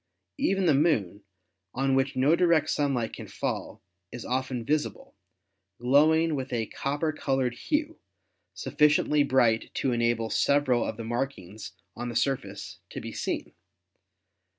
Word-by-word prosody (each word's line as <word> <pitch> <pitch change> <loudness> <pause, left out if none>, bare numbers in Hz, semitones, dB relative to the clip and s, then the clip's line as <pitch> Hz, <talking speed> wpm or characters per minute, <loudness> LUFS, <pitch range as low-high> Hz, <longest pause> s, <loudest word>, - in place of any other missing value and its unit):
Even 195 -1 +1
the 160 - +5
Moon, 125 - +1 0.5
cm 135 0 +1
which 135 +1 +1
no 135 +5 +4
direct 170 -4 +3
sunlight 135 -6 0
can - - -8
fall, - - -4 0.3
is 120 - -7
often 130 -2 -2
visible, 150 +2 -2 0.6
glowing 155 +6 +4
with 135 -2 -4
a 115 -2 -1
copper 145 +7 -2
colored 135 -4 0
hue, 305 - -2 0.6
sufficiently 150 0 +2
bright 120 -5 +2
to 135 - 0
enable 115 -1 0
several 140 -4 +2
of - - -4
the 115 - -5
markings 110 -4 -4 0.2
on 120 +1 -4
the 120 - -6
surface 105 -8 -2
to - - -6
be - - -7
seen. - - -4
135 Hz, 135 wpm, -27 LUFS, 120-150 Hz, 0.6 s, the